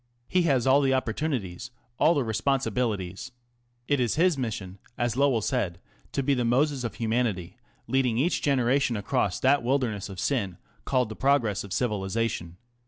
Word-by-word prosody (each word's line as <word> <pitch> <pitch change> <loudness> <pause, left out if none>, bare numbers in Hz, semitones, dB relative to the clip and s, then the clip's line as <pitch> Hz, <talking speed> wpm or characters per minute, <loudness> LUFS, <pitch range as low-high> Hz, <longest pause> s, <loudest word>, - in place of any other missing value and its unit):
He 185 - +2
has 130 -4 +2
all 135 +2 +5
the 135 -1 +2
opportunities, 130 - -2 0.3
all 170 - +5
the 140 - +1
responsibili 115 -4 0
ties. 125 +7 -9 0.6
It 145 -1 +2
is 120 -2 +1
his 175 +1 +3
mission, 105 -7 -4 0.2
as 120 -2 0
Lowell 130 -5 +2
said, 100 -10 -1 0.3
to 140 - 0
be 140 +2 +2
the 125 -2 0
Moses 130 +3 +1
of 115 -4 -4
Humanity, 110 -5 -1 0.3
lead, 135 -1 +1
ing 115 -2 0
each 160 +8 +1
genera 135 -1 +2
tion 120 -5 0
across 100 -2 0
that 140 +2 +4
wilderness 120 -5 -1
of 95 -2 -8
sin 100 -8 -1 0.3
called 125 -4 +1
the 110 - -6
Pro 140 +4 +4
gress 105 -6 -2
of 100 - -9
Civilisa 105 0 0
tion." 85 -1 -7
120 Hz, 180 wpm, -27 LUFS, 105-135 Hz, 0.6 s, all